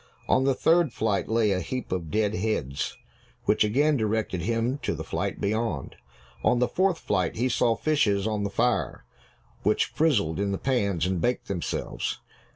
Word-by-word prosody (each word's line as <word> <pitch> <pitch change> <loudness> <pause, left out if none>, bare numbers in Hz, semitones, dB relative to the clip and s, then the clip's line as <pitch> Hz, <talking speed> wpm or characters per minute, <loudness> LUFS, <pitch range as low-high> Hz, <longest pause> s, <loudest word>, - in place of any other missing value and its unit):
On 130 - +3
the 135 -1 +3
third 165 -1 +3
flight 105 -3 0
lay 110 -2 +2
a 95 - +1
heap 125 +8 -5
of 90 -4 -2
dead 105 +3 +1
heads, 95 -10 -2 0.5
which - - +3
again 140 +8 +2
directed 110 -5 -1
him 115 - 0
to 115 - -2
the 80 - -5
flight - - -3
beyond. 105 - -2 0.5
On 125 - +3
the 125 0 +2
fourth 185 +2 +1
flight, 90 - -1
he 120 +3 +1
saw 115 -2 +2
fishes 105 -11 +1
on 105 -1 -1
the 100 - -1
fire, 120 +4 0 0.6
which 105 +2 +2
frizzled 110 - +1
in 100 0 0
the 100 - -1
pans 100 - 0
and 90 -2 -1
baked 125 +1 0
themselves. 90 -4 -3
110 Hz, 170 wpm, -26 LUFS, 95-125 Hz, 0.6 s, On